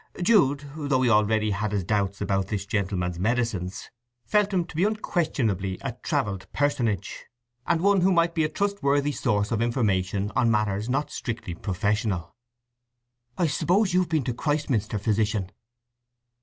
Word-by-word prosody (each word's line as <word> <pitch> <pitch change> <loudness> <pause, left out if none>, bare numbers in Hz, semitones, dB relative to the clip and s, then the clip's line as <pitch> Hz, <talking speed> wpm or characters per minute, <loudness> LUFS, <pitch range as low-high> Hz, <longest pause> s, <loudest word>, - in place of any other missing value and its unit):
Jude, 160 - +3
though 140 -4 0
he 120 - +3
already 105 0 +3
had 105 +1 -1
his 100 -2 -1
doubts 100 0 -1
about 95 -2 0
this 100 -1 -3
gentleman's 95 -4 -2
medicines, 105 -4 -1 0.3
felt 210 -1 +2
him 180 -3 +1
to 175 - -13
be 170 - +2
unquestionably 140 - 0
a 135 - -3
travelled 105 - -2
personage, 120 -9 -1 0.4
and 170 -1 +2
one 200 0 +4
who 190 +2 +4
might 170 -1 +3
be 160 - +1
a 155 - 0
trustworthy 145 -7 0
source 105 -7 0
of 115 -1 0
information 105 -4 0
on 120 - +3
matters 105 0 0
not 135 +4 -1
strictly 115 -8 -4
professional. 100 +1 -2 1.0
"I 175 - +2
s'pose 185 +5 +2
you've 180 -1 +2
been 160 -4 +1
to 125 - -2
Christminster, 135 -7 -1
Physician?" 105 -2 0
115 Hz, 150 wpm, -26 LUFS, 100-155 Hz, 1.0 s, one